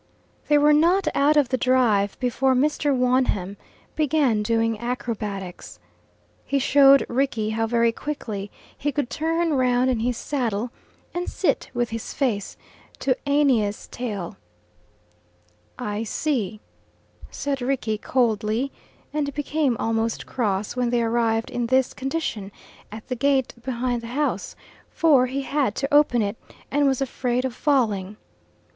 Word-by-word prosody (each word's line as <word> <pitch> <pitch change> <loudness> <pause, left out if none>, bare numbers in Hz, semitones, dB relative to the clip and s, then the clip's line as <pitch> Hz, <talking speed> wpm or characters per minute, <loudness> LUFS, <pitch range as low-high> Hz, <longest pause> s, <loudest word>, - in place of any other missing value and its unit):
They 295 - +5
were 295 +1 +5
not 340 +4 +3
out 295 +2 +3
of 285 -4 +3
the 255 - 0
drive 230 -6 +2
before 260 +1 +1
Mr. 290 +2 +1
Wonham 250 -7 +1 0.4
began 285 -7 +2
doing 225 0 0
acrobatics. 215 -6 -5 0.7
He 280 - -1
showed 275 0 +6
Rickie 235 -4 0
how 225 +1 0
very 235 0 +2
quickly 220 -7 -5 0.3
he 290 - -2
could 280 -3 -2
turn 330 +1 0
round 255 -1 +2
in 240 - 0
his 240 +1 -1
saddle 240 -5 -2 0.4
and 350 0 -3
sit - - 0
with 240 -1 0
his 225 0 -5
face 225 -8 -1 0.4
to 260 -2 +1
Aeneas's 255 -8 +2
tail. 205 -6 -5 1.4
"I 210 -3 -3
see," 225 -3 -2 0.7
said 275 -2 -3
Rickie 245 -4 -1
coldly, 230 +1 0 0.4
and 295 -2 -1
became 290 -3 0
almost 225 0 -1
cross 205 -4 -2
when 250 -1 0
they 240 -1 +1
arrived 225 0 0
in 240 -1 -2
this 260 +1 +2
condition 265 -8 -3 0.4
at 215 +1 -9
the 250 - -2
gate 270 0 +1
behind 245 -1 -2
the 230 - -8
house, 300 -1 -1 0.3
for 280 -6 +4
he 270 +2 -3
had 275 -6 0
to 275 +1 -3
open 290 -6 +4
it, 205 +2 -3 0.3
and 285 0 +3
was 270 -1 +1
afraid 250 -1 -1
of 260 - -2
falling. 215 -8 0
250 Hz, 140 wpm, -24 LUFS, 225-275 Hz, 1.4 s, showed